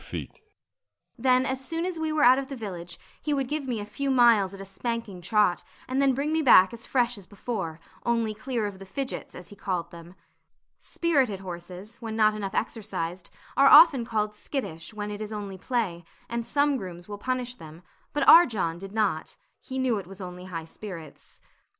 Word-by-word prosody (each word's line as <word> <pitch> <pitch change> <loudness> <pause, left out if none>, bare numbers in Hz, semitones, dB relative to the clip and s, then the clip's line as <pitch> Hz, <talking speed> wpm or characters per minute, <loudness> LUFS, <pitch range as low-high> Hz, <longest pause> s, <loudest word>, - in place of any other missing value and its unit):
Then 255 +1 +3
as 265 0 -2
soon 330 +4 -2
as 360 -3 -3
we 315 -1 -1
were 310 -1 +2
out 255 +2 +7
of 275 - -5
the 275 - -6
village, 180 -7 -7 0.2
he 295 -1 0
would 270 -2 -1
give 295 0 -3
me 240 -4 -1
a 205 - -5
few 275 +7 -3
miles 235 -7 +5
at 195 - -10
a 195 - -7
spanking 210 -1 -4
trot, 205 0 +2 0.2
and 260 +2 0
then 270 -2 +3
bring 290 +4 -1
me 320 - +2
back 215 -8 +7
as 235 0 -8
fresh 245 -3 +1
as 185 - -12
before, 190 -6 -4 0.2
only 230 -2 +1
clear 235 0 -3
of 200 -2 -5
the 195 - -9
fidgets, 270 +6 -5
as 180 -1 -10
he 205 - -12
called 175 -4 -3
them. 170 +1 -12 0.6
Spirited 270 - 0
horses, 185 +4 -8
when 225 -3 -6
not 215 -1 +4
enough 200 -2 -4
exercised, 185 -6 -3 0.3
are 275 - +6
often 295 -4 +8
called 215 -2 -1
skittish, 210 - -5
when 210 -1 -5
it 205 +1 -6
is 215 0 -5
only 200 -3 -6
play; 195 -6 -2 0.2
and 235 0 -3
some 285 0 +2
grooms 175 -5 -8
will 205 -1 -7
punish 250 +1 -2
them, 160 -5 -13 0.3
but 295 -2 0
our 340 +1 +10
John 170 -8 -2
did 195 +1 -9
not; 210 -8 0 0.2
he 265 - -7
knew 255 -5 +1
it 185 - -9
was 195 +1 -11
only 180 -1 -8
high 165 -3 -6
spirits. 165 -4 -10
215 Hz, 200 wpm, -27 LUFS, 190-260 Hz, 0.6 s, our